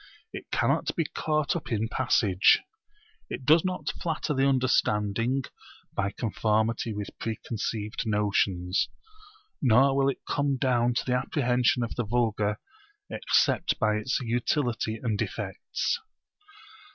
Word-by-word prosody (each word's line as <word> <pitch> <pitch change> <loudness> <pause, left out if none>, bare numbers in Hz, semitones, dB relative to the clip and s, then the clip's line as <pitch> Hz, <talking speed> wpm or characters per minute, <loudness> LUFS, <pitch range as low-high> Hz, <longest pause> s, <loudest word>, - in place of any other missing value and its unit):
It - - -8
cannot - - +1
be 165 - 0
caught 155 0 -1
up 170 - -5
in 110 0 0
passage. 110 -6 +3 0.7
It 130 - -6
does 155 +4 +6
not 180 -5 -2
flatter 160 -2 -1
the 135 0 +2
understanding 120 -1 +1 0.5
by 100 0 0
conformity 110 +1 0
with 105 -1 -6
preconceived 110 -1 -3
notions. 100 -3 +1 0.7
Nor 135 +2 +5
will 135 0 +3
it 135 - -5
come 140 -1 0
down 125 -2 +1
to - - 0
the 125 - 0
apprehension 125 -1 +1
of 115 - -3
the 120 - -2
vulgar 110 -2 0 0.5
except - - +2
by 110 -3 +2
its 110 +5 -1
utility 120 -1 -1
and 110 -2 -2
effects. 480 - -2
120 Hz, 125 wpm, -27 LUFS, 110-135 Hz, 0.7 s, does